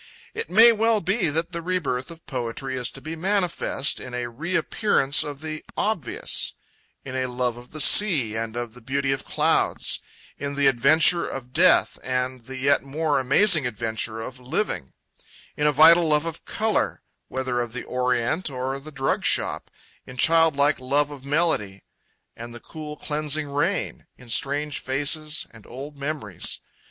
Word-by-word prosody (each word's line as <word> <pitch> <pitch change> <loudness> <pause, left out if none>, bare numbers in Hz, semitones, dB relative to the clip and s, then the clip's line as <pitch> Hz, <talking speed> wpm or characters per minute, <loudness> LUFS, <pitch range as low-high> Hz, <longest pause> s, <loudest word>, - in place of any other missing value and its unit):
It 455 0 -5
may 235 +2 +7
well 225 0 +2
be 195 -1 0
that 165 +4 -2
the 170 -1 -5
rebirth 150 -8 -2
of 165 -1 -12
poetry 130 0 -4
is 125 -1 0
to 135 - -8
be 160 +3 -6
manifest 180 -6 0
in 125 -1 -8
a 120 -1 -3
reappearance 165 - +1
of 145 -1 -7
the 155 -1 -6
obvious, 205 - 0 0.5
in 130 -1 -6
a 130 0 -1
love 125 -1 -2
of 120 +1 -13
the 155 - -8
sea 145 - +6
and 115 0 -4
of 120 -2 -5
the 125 - -14
beauty 135 +3 -1
of 135 0 -2
clouds, - - +1 0.4
in 140 0 -4
the 140 0 +1
adventure 145 +7 +4
of 125 -1 -8
death 180 +4 +3
and 125 -1 -3
the 130 +1 -8
yet 140 +2 +2
more 145 +1 -1
amazing 150 +3 +4
adventure 110 0 -3
of 125 +3 -7
living, 125 - -3 0.6
in 150 - +1
a - - +4
vital 165 +4 +6
love 150 0 +2
of 165 -1 -5
colour, 220 -1 -1 0.2
whether 130 -2 -2
of 120 -1 -4
the 125 - -6
Orient 125 +6 -1
or 130 +1 -4
the 155 +3 -10
drug 135 -2 -1
shop, - - +1 0.4
in 125 - -11
childlike 155 -1 +3
love 140 +3 0
of 140 -3 -10
melody, 140 - -1 0.5
and 120 +1 -9
the - - -9
cool 150 +2 -9
cleansing 150 0 -1
of 140 - -10
rain, 145 - -2
in 125 -1 -14
strange 145 +4 +1
faces 150 +3 -1
and 110 -3 -16
old 140 +4 -9
memories. 140 - -4
140 Hz, 165 wpm, -24 LUFS, 125-160 Hz, 0.6 s, may